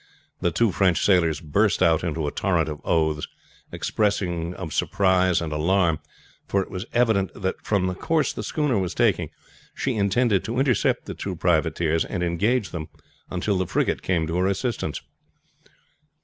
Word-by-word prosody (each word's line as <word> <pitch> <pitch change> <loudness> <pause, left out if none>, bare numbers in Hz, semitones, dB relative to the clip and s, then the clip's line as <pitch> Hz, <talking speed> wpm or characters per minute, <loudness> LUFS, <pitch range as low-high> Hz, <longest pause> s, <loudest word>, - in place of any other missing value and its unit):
The 85 - +1
two 105 +6 +2
French 90 -3 +2
sailors 85 -6 +3
burst 75 -2 +2
out 80 0 +3
into 80 -2 -2
a 75 - -2
torrent 85 -5 0
of 75 -1 -6
oaths, 80 -2 +1 0.4
expressive 90 -5 -1
of 80 -5 -6
surprise 95 -2 +2
and 80 -2 -3
alarm; 85 0 +2 0.5
for 100 - +1
it - - -14
was 95 +3 -5
evident 110 -6 +2
that 95 -1 -3
from 100 -3 +1
the 90 - -1
course 160 - 0
the - - -5
schooner 145 -8 0
was 90 -2 -3
taking - - +2 0.5
she 135 - -1
intended 105 0 +2
to 115 +2 -3
intercept 130 -2 +1
the - - -5
two - - -5
privateers, 80 -1 +1
and 90 -3 -3
engage 105 +7 0
them 80 -3 -5 0.4
until 95 +2 -1
the 95 - -1
frigate - - 0
came 85 -3 0
to 80 +2 -2
her 90 +1 +2
assistance. 110 +4 -2
90 Hz, 165 wpm, -24 LUFS, 85-100 Hz, 0.5 s, sailors